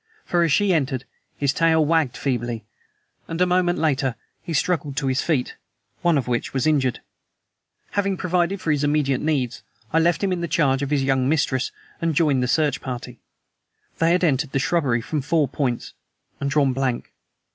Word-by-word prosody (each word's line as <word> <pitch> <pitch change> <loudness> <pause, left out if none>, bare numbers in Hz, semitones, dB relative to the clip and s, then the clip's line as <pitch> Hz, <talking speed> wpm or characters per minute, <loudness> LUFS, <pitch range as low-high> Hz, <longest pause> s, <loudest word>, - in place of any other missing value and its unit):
For, 175 - +1
as 165 -2 +2
she 195 +5 +3
entered, 135 -5 0 0.3
his 140 -1 +1
tail 160 -1 +3
wagged 155 -5 +1
feebly, 120 -4 -2 0.6
and 165 0 -4
a 180 - +5
moment 180 -1 +2
later 135 -5 +1 0.3
he 170 - -7
struggled 150 -3 0
to 145 - 0
his 130 0 +1
feet 145 -7 -1 0.5
one 170 -3 +3
of 135 - -1
which 120 +2 -2
was 130 - +1
injured. 135 -5 +1 0.9
Having 200 -2 0
provided 180 +2 0
for 165 - -1
his 150 -1 +1
immediate 145 -3 +1
needs, 135 -6 -1 0.3
I 160 - +5
left 170 +2 +2
him 190 -2 +1
in 175 - -3
charge 140 -4 +2
of 140 - -2
his 145 -2 +1
young 135 -1 +2
mistress 145 -4 +1 0.3
and 165 -2 0
joined 145 -5 +3
the 125 - 0
search 150 +3 +1
party. 125 -3 -6 0.8
They 165 0 +3
had 180 - +1
entered 145 -3 +1
the - - +2
shrubbery 150 -7 +1
from 150 +4 -2
four 150 +1 +1
points 130 -2 -2 0.5
and 140 - -1
drawn 140 -2 +2
blank. 130 -2 -2
145 Hz, 180 wpm, -23 LUFS, 130-165 Hz, 0.9 s, a